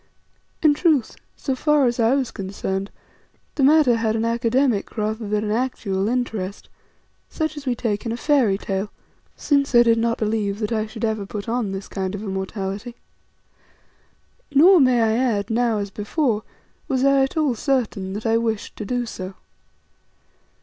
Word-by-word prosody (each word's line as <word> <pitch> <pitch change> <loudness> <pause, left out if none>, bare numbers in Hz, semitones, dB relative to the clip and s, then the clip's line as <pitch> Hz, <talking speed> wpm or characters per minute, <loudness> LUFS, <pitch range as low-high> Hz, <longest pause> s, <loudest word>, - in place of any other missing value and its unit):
In 305 -2 +6
truth, 290 -6 +1 0.2
so 270 - -2
far 295 +1 +2
as 240 0 0
I 230 +3 +4
was 265 -4 -1
concerned, 195 0 -4 0.6
the 295 - -2
matter 275 -3 +5
had 225 -1 0
an 225 0 0
academic 235 0 0
rather 215 +1 -2
than 210 +1 0
an 210 - -2
actual 215 -4 -1
interest, 220 -6 -3 0.6
such 315 -1 -2
as 290 -2 -9
we 250 - +1
take 215 -4 -2
in 230 - -3
a 230 - -3
fairy 250 -9 +2
tale, 195 0 -3 0.5
since 280 -3 +1
I 240 - +8
did 230 -1 +3
not 230 0 0
believe 210 -2 -1
that 210 0 -3
I 220 -1 0
should 220 +1 -4
ever 215 -3 -2
put 205 +1 -6
on 230 -3 -1
this 195 +1 -5
kind 190 0 -3
of 205 - -6
immortality. 195 +3 -4 1.6
Nor, 340 +7 +7
I - - +5
may 255 -4 +4 0.2
add, 225 -4 0
now 230 -1 +1
as 200 -1 -4
before, 215 +2 -1 0.5
was 265 -2 +1
I 275 0 +4
at 270 +4 -1
all 300 -5 +2
certain 225 -7 -1
that 210 +2 -6
I 225 0 +3
wished 225 -2 -2
to 210 - -5
do 245 +3 -1
so. 190 -4 -7
230 Hz, 170 wpm, -22 LUFS, 205-260 Hz, 1.6 s, I